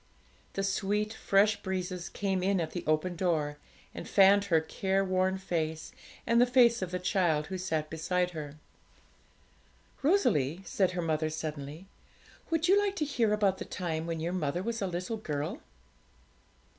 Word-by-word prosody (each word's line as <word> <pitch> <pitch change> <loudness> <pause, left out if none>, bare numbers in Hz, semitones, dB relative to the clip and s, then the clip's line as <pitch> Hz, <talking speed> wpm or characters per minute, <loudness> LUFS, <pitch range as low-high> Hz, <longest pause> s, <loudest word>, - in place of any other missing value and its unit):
The 195 - -2
sweet 205 +2 0
fresh 205 0 +2
breezes 185 -2 -3
came 195 -2 -1
in 195 0 +1
at 165 - -2
the 175 - -5
open 155 +4 +1
door, 155 -5 0 0.4
and - - -7
fanned 200 +1 +6
her 170 -5 +3
careworn 190 +2 0
face 160 -4 -3 0.3
and 235 +1 +4
the 245 - +5
face 240 -2 +5
of 185 - -2
the 180 - -2
child 175 -4 +1
who 190 +1 -5
sat 160 -4 -1
beside 180 +3 0
her. 150 -3 -7 1.5
'Rosalie,' 185 - +2
said 185 -2 +1
her 175 -1 -2
mother 155 -1 0
suddenly, 155 +1 -6 0.6
'would 325 0 +1
you 390 +3 +6
like 405 -1 0
to 310 - -1
hear 240 -7 +1
about 205 -3 +2
the - - -3
time 165 -3 -3
when 165 -1 -3
your 170 +3 -2
mother 175 0 -1
was 230 +1 -3
a 195 - 0
little 180 +5 -3
girl?' 160 - -4
185 Hz, 160 wpm, -30 LUFS, 160-200 Hz, 1.5 s, fanned